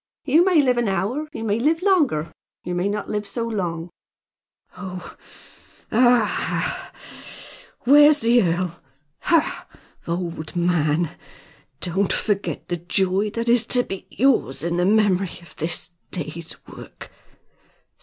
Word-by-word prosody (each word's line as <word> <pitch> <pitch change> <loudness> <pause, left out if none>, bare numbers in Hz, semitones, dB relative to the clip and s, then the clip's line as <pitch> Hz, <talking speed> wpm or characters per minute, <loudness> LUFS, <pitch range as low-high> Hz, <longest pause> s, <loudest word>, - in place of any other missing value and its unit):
"You 310 +5 +5
may 355 -5 +4
live 250 -2 +2
an 240 - 0
hour; 200 - -1
you 310 - -6
may 215 0 0
live 320 +7 +1
longer, 320 - +3
and 160 - -10 0.3
you 180 - -4
may 180 +3 0
not 210 0 -3
live 210 -1 -3
so 230 +2 -3
long." 175 -6 -3 0.8
"Oh! 185 -2 -8 0.8
Aha! 240 -1 +5
ha! - - -2 0.3
ha! - - -12
Where's 295 +3 +6
the 235 +1 +4
earl? 175 -2 -1 0.4
Ha! 330 -3 +1 0.4
old 170 -1 -4
man! 170 -2 +1 0.7
Don't 185 +2 0
forget 180 -8 -1
the 175 -1 -2
joy 190 +4 +1
that 230 +2 -4
is 240 -1 +5
to 245 -1 +3
be 195 -4 -7
yours 220 - +1
in 170 +1 -1
the 175 - +2
memory 195 -3 +2
of 160 -3 -16
this 165 +2 -3 0.2
day's 165 -1 -5
work! - - -12
195 Hz, 140 wpm, -22 LUFS, 175-240 Hz, 0.8 s, Where's